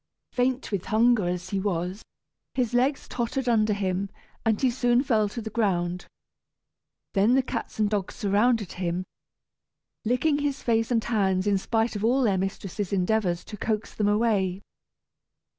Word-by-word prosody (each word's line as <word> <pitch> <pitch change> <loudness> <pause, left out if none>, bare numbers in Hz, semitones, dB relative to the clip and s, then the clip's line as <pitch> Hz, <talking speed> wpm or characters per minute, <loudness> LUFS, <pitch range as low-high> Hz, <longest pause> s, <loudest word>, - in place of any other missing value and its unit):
Faint 255 0 0
with 195 -3 -2
hunger 225 -3 +3
as 180 +1 -3
he 200 - 0
was, 185 0 -2 0.5
his 245 -2 0
legs 260 +4 +1
tottered 250 +2 -2
under 220 -3 +3
him, 195 -1 -1 0.3
and 220 -2 +2
he 260 -2 +3
soon 245 0 +2
fell 220 -7 +2
to 230 +2 -6
the 220 - -5
ground. 180 -5 0 1.1
Then 210 +5 +4
the 265 - +3
cats - - -5
and 215 -1 +2
dogs 205 -2 -2
surrounded 210 0 +2
him, 180 0 -2 1.0
licking 260 +6 +2
his 285 -1 -2
face 225 -1 +1
and 230 -3 +1
hands 195 -4 +1
in 200 -2 +2
spite 225 +3 0
of 205 - -3
all 255 +4 +3
their 200 -5 +2
mistress's 195 0 -3
endeavors 185 -2 +1
to 210 - -8
coax 215 +1 -2
them 210 - 0
away. 205 -3 +1
215 Hz, 160 wpm, -26 LUFS, 195-240 Hz, 1.1 s, Then